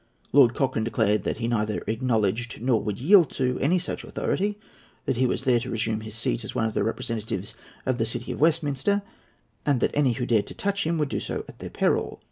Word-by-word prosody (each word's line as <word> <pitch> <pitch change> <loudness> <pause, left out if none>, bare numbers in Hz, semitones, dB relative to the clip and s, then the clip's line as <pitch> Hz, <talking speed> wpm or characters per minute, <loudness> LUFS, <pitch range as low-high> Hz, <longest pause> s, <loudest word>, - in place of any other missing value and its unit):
Lord 130 -4 +6
Cochrane 130 -5 0
declared 110 -2 +1
that - - -1
he 115 0 -2
neither 105 -3 0
acknowledged, 115 -1 0
nor 120 -2 +2
would 105 -1 -3
yield 170 +3 +6
to, 125 -1 0
any 165 +7 +3
such 180 - -4
authority, 205 +1 -1 0.5
that 120 - 0
he 130 +1 +3
was 125 - -1
there 125 -3 +4
to 125 +2 -6
resume 110 -1 -1
his 110 0 -8
seat 115 +1 -1
as 105 - -7
one 115 - +1
of 110 - -1
the - - +1
representatives 110 -2 -3 0.3
of 130 -1 0
the 115 - +2
City 120 +2 -4
of - - -5
Westminster, 165 +5 +2 0.6
and 140 -4 +2
that - - +1
any 140 -4 +3
who 125 +1 -2
dared 110 -4 +2
to - - -8
touch 200 -3 -1
him 165 0 +1
would 150 -3 0
do - - -1
so - - -4
at - - -13
their - - -6
peril. - - 0
120 Hz, 225 wpm, -26 LUFS, 110-145 Hz, 0.6 s, Lord